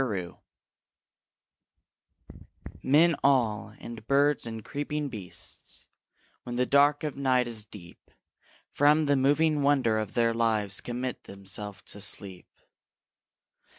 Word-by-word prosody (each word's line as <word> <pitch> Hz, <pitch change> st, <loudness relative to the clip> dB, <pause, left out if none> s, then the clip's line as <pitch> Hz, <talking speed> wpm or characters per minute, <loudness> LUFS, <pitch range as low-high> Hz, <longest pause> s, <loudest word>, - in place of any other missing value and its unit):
SLEEP 95 Hz, -8 st, -3 dB, 2.5 s
Men 160 Hz, +5 st, +4 dB
all, 115 Hz, -6 st, +2 dB
and 115 Hz, -2 st, -9 dB
birds, 140 Hz, -2 st, +3 dB
and 115 Hz, -2 st, -7 dB
creeping 145 Hz, 0 st, -3 dB
beasts, 100 Hz, -7 st, -8 dB, 0.6 s
When 120 Hz, -, -6 dB
the 125 Hz, +1 st, +2 dB
dark 145 Hz, +2 st, +4 dB
of 150 Hz, -2 st, -3 dB
night 130 Hz, -3 st, +2 dB
is 110 Hz, -3 st, -5 dB
deep, 90 Hz, -5 st, -14 dB, 0.6 s
From 150 Hz, +2 st, +4 dB
the 145 Hz, 0 st, +3 dB
moving 145 Hz, +3 st, +3 dB
wonder 135 Hz, -6 st, +3 dB
of 110 Hz, -2 st, -5 dB
their 115 Hz, -1 st, +3 dB
lives 110 Hz, -4 st, 0 dB
Commit 125 Hz, +1 st, -4 dB
themselves 100 Hz, +1 st, -6 dB
to 105 Hz, -, -7 dB
sleep. 95 Hz, -3 st, -2 dB
120 Hz, 115 wpm, -28 LUFS, 105-145 Hz, 2.5 s, Men